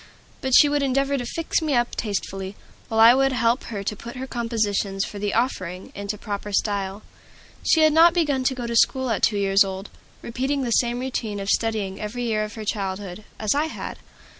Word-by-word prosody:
But 265 Hz, -3 st, -2 dB
she 295 Hz, -, +7 dB
would 290 Hz, 0 st, +1 dB
endeavor 275 Hz, +1 st, +1 dB
to 245 Hz, -3 st, -2 dB
"fix 330 Hz, +5 st, -1 dB
me 305 Hz, -4 st, 0 dB
up" 240 Hz, 0 st, +1 dB
tastefully, 195 Hz, -2 st, -4 dB, 0.3 s
while 225 Hz, -, -1 dB
I 230 Hz, +2 st, +9 dB
would 270 Hz, +1 st, +2 dB
help 235 Hz, 0 st, +1 dB
her 205 Hz, -3 st, -5 dB
to 210 Hz, -, -2 dB
put 235 Hz, +5 st, -9 dB
her 260 Hz, +1 st, -5 dB
compositions 215 Hz, -5 st, -1 dB
for 205 Hz, -, -8 dB
the 205 Hz, 0 st, -1 dB
"Offering" 190 Hz, -7 st, -2 dB
into 200 Hz, +1 st, -4 dB
proper 205 Hz, -1 st, -5 dB
style. 200 Hz, 0 st, -1 dB, 0.6 s
She 320 Hz, -, +4 dB
had 310 Hz, -1 st, +5 dB
not 330 Hz, +2 st, +6 dB
begun 290 Hz, -6 st, +1 dB
to 260 Hz, -, +2 dB
go 245 Hz, -2 st, -5 dB
to 235 Hz, 0 st, -3 dB
school 260 Hz, +1 st, +3 dB
at 220 Hz, -, -1 dB
two 210 Hz, -, +3 dB
years 195 Hz, 0 st, +4 dB
old, 190 Hz, +1 st, -6 dB, 0.3 s
repeating 265 Hz, +4 st, -2 dB
the 240 Hz, -, -2 dB
same 240 Hz, +1 st, +2 dB
routine 230 Hz, -5 st, -3 dB
of 195 Hz, 0 st, -4 dB
study 210 Hz, -4 st, 0 dB
every 225 Hz, +4 st, -4 dB
year 220 Hz, -3 st, 0 dB
of 210 Hz, -1 st, -6 dB
her 220 Hz, -1 st, -6 dB
childhood, 195 Hz, 0 st, -4 dB
as 215 Hz, -2 st, +1 dB
I 295 Hz, +2 st, +1 dB
had. 320 Hz, -, -6 dB
225 Hz, 210 wpm, -23 LUFS, 200-260 Hz, 0.6 s, I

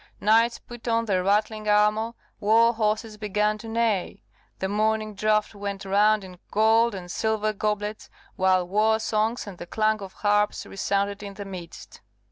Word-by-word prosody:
Knights 225 Hz, +3 st, +3 dB
put 240 Hz, 0 st, -12 dB
on 230 Hz, 0 st, +1 dB
their 190 Hz, -4 st, +1 dB
rattling 215 Hz, +2 st, 0 dB
armour, 210 Hz, +2 st, +3 dB, 0.3 s
war 225 Hz, +2 st, +4 dB
horses 215 Hz, -1 st, -1 dB
began 210 Hz, 0 st, 0 dB
to 225 Hz, -, -9 dB
neigh, 225 Hz, -4 st, -1 dB, 0.3 s
the 190 Hz, -, -2 dB
morning 215 Hz, +1 st, 0 dB
draught 215 Hz, +1 st, +1 dB
went 200 Hz, -1 st, -5 dB
round 205 Hz, +2 st, +3 dB
in 180 Hz, -2 st, -12 dB
gold 225 Hz, +1 st, +3 dB
and 175 Hz, -2 st, -7 dB
silver 215 Hz, 0 st, 0 dB
goblets, 210 Hz, 0 st, -3 dB, 0.3 s
while 185 Hz, -1 st, +2 dB
war 215 Hz, +3 st, +2 dB
songs 220 Hz, +2 st, -1 dB
and 195 Hz, -4 st, -10 dB
the 175 Hz, -, -8 dB
clang 215 Hz, +1 st, +1 dB
of 195 Hz, -1 st, -8 dB
harps 205 Hz, 0 st, +1 dB
resounded 200 Hz, +1 st, -2 dB
in 200 Hz, -1 st, -8 dB
the 200 Hz, 0 st, -7 dB
midst. 180 Hz, -4 st, -10 dB
210 Hz, 160 wpm, -25 LUFS, 200-220 Hz, 0.3 s, war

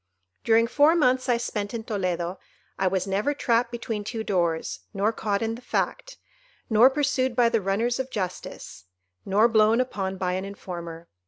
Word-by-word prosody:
"During 230 Hz, 0 st, +4 dB
four 290 Hz, +7 st, +4 dB
months 255 Hz, -4 st, +2 dB
I 240 Hz, -, +4 dB
spent 215 Hz, -2 st, -3 dB
in 225 Hz, -, -4 dB
Toledo, 185 Hz, -5 st, -2 dB, 0.4 s
I 190 Hz, -, +2 dB
was 185 Hz, 0 st, 0 dB
never 205 Hz, +9 st, 0 dB
trapped 235 Hz, -3 st, +1 dB
between 225 Hz, -3 st, -4 dB
two 220 Hz, +1 st, -4 dB
doors, 170 Hz, -, -1 dB, 0.2 s
nor 205 Hz, +3 st, +1 dB
caught 205 Hz, -1 st, -1 dB
in 225 Hz, 0 st, -1 dB
the 235 Hz, -, -8 dB
fact, -, -, -3 dB, 0.5 s
nor 225 Hz, +4 st, +7 dB
pursued 265 Hz, -3 st, 0 dB
by 235 Hz, -1 st, +4 dB
the 230 Hz, -2 st, +1 dB
runners 225 Hz, +6 st, 0 dB
of 265 Hz, 0 st, -3 dB
justice, 185 Hz, -, -6 dB, 0.4 s
nor 205 Hz, +4 st, +4 dB
blown 220 Hz, 0 st, +4 dB
upon 195 Hz, -7 st, -2 dB
by 180 Hz, -1 st, -1 dB
an 185 Hz, +1 st, -2 dB
informer. 170 Hz, -4 st, -8 dB
220 Hz, 170 wpm, -25 LUFS, 190-240 Hz, 0.5 s, nor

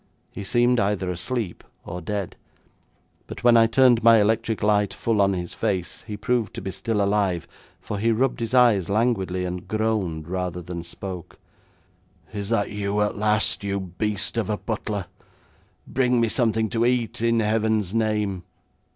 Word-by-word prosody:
He 100 Hz, -, -7 dB
seemed 120 Hz, +3 st, +2 dB
either 100 Hz, -2 st, 0 dB
asleep 95 Hz, +2 st, -4 dB, 0.2 s
or 90 Hz, +1 st, -6 dB
dead, 100 Hz, +1 st, -4 dB, 0.9 s
but -, -, -8 dB
when 120 Hz, -1 st, +6 dB
I 115 Hz, -1 st, +6 dB
turned 120 Hz, 0 st, +4 dB
my 115 Hz, 0 st, +7 dB
electric 110 Hz, +1 st, +1 dB
light 105 Hz, -1 st, +2 dB
full 110 Hz, -3 st, +1 dB
on 100 Hz, 0 st, +3 dB
his 90 Hz, -2 st, -4 dB
face 90 Hz, -3 st, -2 dB
he 105 Hz, -2 st, -5 dB
proved 120 Hz, 0 st, -1 dB
to -, -, -5 dB
be 95 Hz, -, -3 dB
still 105 Hz, +2 st, -1 dB
alive, 100 Hz, -4 st, 0 dB, 0.3 s
for 105 Hz, -, -5 dB
he 115 Hz, +3 st, +2 dB
rubbed 125 Hz, +4 st, +1 dB
his 115 Hz, +2 st, -2 dB
eyes 115 Hz, -8 st, +4 dB
languidly, 100 Hz, -4 st, 0 dB
and 90 Hz, 0 st, -5 dB
groaned, 105 Hz, -8 st, -1 dB
rather 90 Hz, -1 st, -3 dB
than 85 Hz, 0 st, -5 dB
spoke: 90 Hz, +1 st, -8 dB, 1.0 s
'Is 100 Hz, -1 st, -4 dB
that 115 Hz, -3 st, 0 dB
you 105 Hz, 0 st, -2 dB
at 105 Hz, -, 0 dB
last, 105 Hz, 0 st, +1 dB
you 100 Hz, 0 st, -1 dB
beast 100 Hz, +4 st, -3 dB
of 110 Hz, -4 st, -1 dB
a 105 Hz, -, 0 dB
butler? 105 Hz, -4 st, -3 dB, 0.8 s
Bring 125 Hz, -2 st, +1 dB
me 115 Hz, -1 st, +2 dB
something 110 Hz, -2 st, +1 dB
to 115 Hz, -1 st, +1 dB
eat, 120 Hz, -2 st, 0 dB
in 115 Hz, 0 st, +2 dB
Heaven's 110 Hz, -2 st, +1 dB
name!' 105 Hz, -4 st, 0 dB
105 Hz, 165 wpm, -24 LUFS, 95-115 Hz, 1.0 s, my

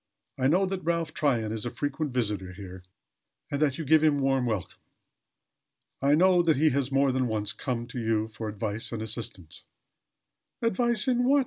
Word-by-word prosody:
I 130 Hz, -, +3 dB
know 180 Hz, +7 st, +3 dB
that 190 Hz, 0 st, -3 dB
Ralph 170 Hz, -2 st, -1 dB
Tryon 120 Hz, -7 st, 0 dB
is 110 Hz, -1 st, -3 dB
a 120 Hz, -, -2 dB
frequent 145 Hz, +3 st, -3 dB
visitor 105 Hz, -7 st, -2 dB
here 95 Hz, -1 st, -9 dB, 0.7 s
and 145 Hz, -, -2 dB
that 140 Hz, -3 st, +2 dB
you 160 Hz, -, -4 dB
give 155 Hz, +2 st, +5 dB
him 150 Hz, -2 st, +4 dB
warm 135 Hz, -2 st, +1 dB
welcome. 105 Hz, -6 st, -3 dB, 1.2 s
I 140 Hz, +2 st, +4 dB
know 180 Hz, +2 st, +5 dB
that 165 Hz, -2 st, +3 dB
he 155 Hz, +2 st, +4 dB
has 140 Hz, 0 st, -1 dB
more 135 Hz, 0 st, +3 dB
than 130 Hz, -1 st, 0 dB
once 105 Hz, -2 st, -1 dB
come 120 Hz, -3 st, -3 dB
to 125 Hz, +1 st, -6 dB
you 110 Hz, -1 st, 0 dB
for 110 Hz, 0 st, -6 dB
advice 105 Hz, +1 st, -3 dB
and 115 Hz, -2 st, -4 dB
assistance 105 Hz, -7 st, -5 dB, 0.5 s
" -, -, -58 dB
"Advice, 230 Hz, 0 st, +1 dB
in 245 Hz, -1 st, +2 dB
what?" 280 Hz, +3 st, +5 dB
130 Hz, 190 wpm, -27 LUFS, 110-160 Hz, 1.2 s, give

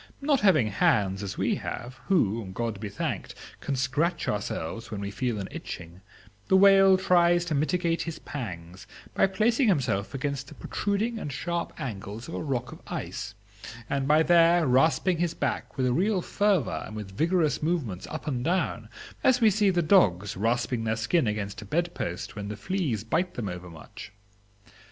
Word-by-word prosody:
Not 280 Hz, -1 st, +2 dB
having 155 Hz, -, +4 dB
hands 95 Hz, -1 st, +2 dB
as 100 Hz, -2 st, -5 dB
we -, -, +1 dB
have, 125 Hz, +2 st, -6 dB
who, 115 Hz, -, +1 dB
God 115 Hz, -3 st, -2 dB
be 105 Hz, -1 st, -5 dB
thanked, 100 Hz, -, -4 dB, 0.2 s
can 140 Hz, -, -2 dB
scratch 135 Hz, +7 st, 0 dB
ourselves 105 Hz, +2 st, -3 dB
when 105 Hz, -3 st, -5 dB
we 100 Hz, 0 st, -4 dB
feel 115 Hz, +2 st, -2 dB
an 100 Hz, -2 st, -4 dB
itching, 85 Hz, +2 st, -8 dB, 0.5 s
the 190 Hz, -, +5 dB
whale 195 Hz, -1 st, +7 dB
tries 175 Hz, -2 st, +3 dB
to 165 Hz, -, -2 dB
mitigate 165 Hz, +3 st, 0 dB
his 165 Hz, -1 st, -4 dB
pangs 90 Hz, -, -7 dB, 0.3 s
by -, -, +4 dB
placing 225 Hz, +6 st, +2 dB
himself 135 Hz, -, 0 dB
against 140 Hz, 0 st, -3 dB
the -, -, -12 dB
protruding 215 Hz, +3 st, -2 dB
and 150 Hz, -, -5 dB
sharp 170 Hz, +5 st, -3 dB
angles 110 Hz, -4 st, -6 dB
of 165 Hz, -, -8 dB
a -, -, -3 dB
rock 135 Hz, -5 st, -2 dB
of -, -, -11 dB
ice, 105 Hz, +2 st, -5 dB, 0.5 s
and 135 Hz, -1 st, -1 dB
by 155 Hz, +2 st, +5 dB
there 170 Hz, 0 st, +5 dB
rasping 160 Hz, +6 st, +3 dB
his 175 Hz, -1 st, 0 dB
back -, -, -3 dB
with 130 Hz, -, +1 dB
a 125 Hz, -, +2 dB
real 185 Hz, -, +1 dB
fervor 200 Hz, -, +1 dB
and 110 Hz, -, -9 dB
with 100 Hz, -3 st, -7 dB
vigorous 160 Hz, -, +1 dB
movements 150 Hz, -, -2 dB
up 155 Hz, -, -6 dB
and 130 Hz, -5 st, -2 dB
down, 180 Hz, +6 st, -1 dB, 0.3 s
as 255 Hz, -1 st, +4 dB
we 225 Hz, -3 st, +5 dB
see 205 Hz, 0 st, +3 dB
the 175 Hz, -2 st, +1 dB
dogs 100 Hz, -, +3 dB
rasping 115 Hz, +3 st, 0 dB
their 110 Hz, 0 st, 0 dB
skin 120 Hz, +6 st, +1 dB
against 105 Hz, -1 st, -3 dB
a -, -, -9 dB
bed 170 Hz, -, -1 dB
post 85 Hz, +1 st, -5 dB
when 100 Hz, -1 st, -5 dB
the 105 Hz, 0 st, -5 dB
fleas 140 Hz, -, -2 dB
bite 170 Hz, +11 st, -1 dB
them 115 Hz, -4 st, -3 dB
overmuch. 90 Hz, -3 st, -9 dB
140 Hz, 180 wpm, -27 LUFS, 105-175 Hz, 0.5 s, whale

